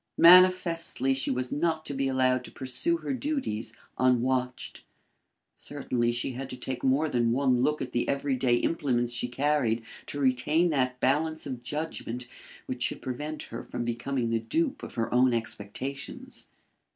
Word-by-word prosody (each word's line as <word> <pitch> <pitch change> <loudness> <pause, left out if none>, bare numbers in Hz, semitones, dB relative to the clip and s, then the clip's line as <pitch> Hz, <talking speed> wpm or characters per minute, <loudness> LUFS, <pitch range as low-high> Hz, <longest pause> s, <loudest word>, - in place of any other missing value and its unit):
Manifestly 170 -6 +5
she 135 - 0
was 125 -1 -1
not 160 +1 0
to - - -4
be 135 0 0
allowed 130 -1 +2
to - - -10
pursue 220 - +1
her 275 - -3
duties 260 - -2 0.3
unwatched. 125 0 +1 0.7
Certainly 125 -4 -2
she 120 +2 -2
had 130 +2 -6
to 125 - -7
take 130 0 -5
more 135 +4 +3
than 120 -5 +1
one 130 -1 +2
look 150 +3 +1
at - - -7
the 120 - -1
every 140 -1 0
day 125 -1 +2
implements 120 -4 0
she 120 0 0
carried 125 -3 +1 0.2
to 145 - -5
retain 145 +6 +2
that 130 -3 0
balance 155 +4 +1
of 130 -4 -5
judgment 125 -3 -4 0.4
which 125 -1 -5
should - - 0
prevent 150 +5 -4
her - - -7
from 120 - -4
becoming 120 +1 -2
the 115 - +2
dupe 310 - -1
of - - -8
her 115 0 -1
own 125 0 +4
expectations. 115 +5 -5
130 Hz, 165 wpm, -28 LUFS, 125-150 Hz, 0.7 s, Manifestly